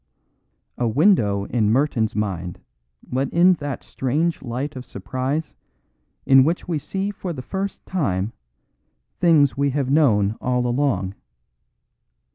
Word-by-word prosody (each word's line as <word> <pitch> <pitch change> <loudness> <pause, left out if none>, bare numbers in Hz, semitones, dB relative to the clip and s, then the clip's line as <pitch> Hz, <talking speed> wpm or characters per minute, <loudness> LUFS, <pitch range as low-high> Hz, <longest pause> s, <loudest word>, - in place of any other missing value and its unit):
A 120 - +1
window 115 - +3
in 110 -2 +1
Merton's 120 -4 +1
mind 90 -5 -3 0.5
let 130 +2 0
in 180 +2 +5
that 145 -3 -5
strange 155 +6 -1
light 130 +4 -4
of 130 - -6
surprise 130 +9 -3 0.7
in 135 -1 +7
which 165 +5 -1
we 165 -4 -1
see 195 +7 -3
for 185 -3 -5
the 130 -4 -7
first 195 +6 -4
time 115 - -1 0.9
things 155 -6 +4
we 140 0 +1
have 135 -1 -1
known 110 -9 +3
all 125 0 0
along. 120 -7 0
135 Hz, 125 wpm, -22 LUFS, 115-155 Hz, 0.9 s, in